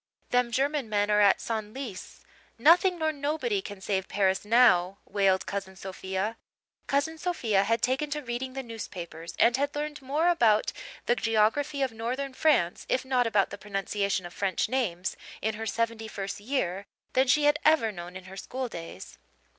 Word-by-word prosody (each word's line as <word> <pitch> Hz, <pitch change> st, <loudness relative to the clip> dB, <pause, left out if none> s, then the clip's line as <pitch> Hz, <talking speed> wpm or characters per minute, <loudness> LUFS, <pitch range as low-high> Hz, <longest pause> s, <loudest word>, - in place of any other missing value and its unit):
"Them 245 Hz, -1 st, +2 dB
German 275 Hz, 0 st, 0 dB
men 205 Hz, 0 st, +1 dB
are 210 Hz, 0 st, +4 dB
at 200 Hz, -2 st, +5 dB
Senlis. 220 Hz, -1 st, -5 dB, 0.4 s
Nothing 350 Hz, +8 st, +5 dB
nor 315 Hz, -1 st, +1 dB
nobody 310 Hz, +9 st, -1 dB
can 205 Hz, -, -9 dB
save 190 Hz, -1 st, -1 dB
Paris 190 Hz, -2 st, +1 dB
now," 205 Hz, -5 st, +4 dB
wailed 195 Hz, -2 st, +2 dB
Cousin 195 Hz, -1 st, -5 dB
Sophia. 190 Hz, +3 st, -4 dB, 0.5 s
Cousin 285 Hz, +3 st, 0 dB
Sophia 235 Hz, -, +1 dB
had 230 Hz, +2 st, +1 dB
taken 265 Hz, +4 st, +1 dB
to 295 Hz, 0 st, -3 dB
reading 250 Hz, +1 st, -4 dB
the 270 Hz, 0 st, -4 dB
newspapers 175 Hz, -8 st, -7 dB
and 240 Hz, +2 st, +4 dB
had 285 Hz, +1 st, -1 dB
learned 295 Hz, 0 st, -4 dB
more 290 Hz, +6 st, 0 dB
about 225 Hz, -11 st, +3 dB, 0.3 s
the 240 Hz, -, +3 dB
geography 245 Hz, +7 st, +1 dB
of 265 Hz, -, 0 dB
northern 250 Hz, +5 st, -3 dB
France, 255 Hz, -, +2 dB
if 260 Hz, -, +1 dB
not 255 Hz, -2 st, +2 dB
about 210 Hz, -3 st, +2 dB
the 205 Hz, -, -7 dB
pronunciation 200 Hz, -2 st, -2 dB
of 175 Hz, -, -9 dB
French 195 Hz, -2 st, 0 dB
names, 190 Hz, -9 st, -1 dB, 0.2 s
in 220 Hz, +1 st, -1 dB
her 225 Hz, +1 st, -5 dB
seventy 230 Hz, -1 st, -1 dB
first 200 Hz, -2 st, -5 dB
year 200 Hz, -5 st, -2 dB, 0.3 s
than 260 Hz, +1 st, +3 dB
she 295 Hz, +4 st, +4 dB
had 295 Hz, 0 st, +4 dB
ever 305 Hz, -8 st, +4 dB
known 175 Hz, -1 st, -9 dB
in 185 Hz, -, -8 dB
her 190 Hz, +1 st, -11 dB
schooldays. 195 Hz, -, -6 dB
225 Hz, 170 wpm, -28 LUFS, 195-275 Hz, 0.5 s, at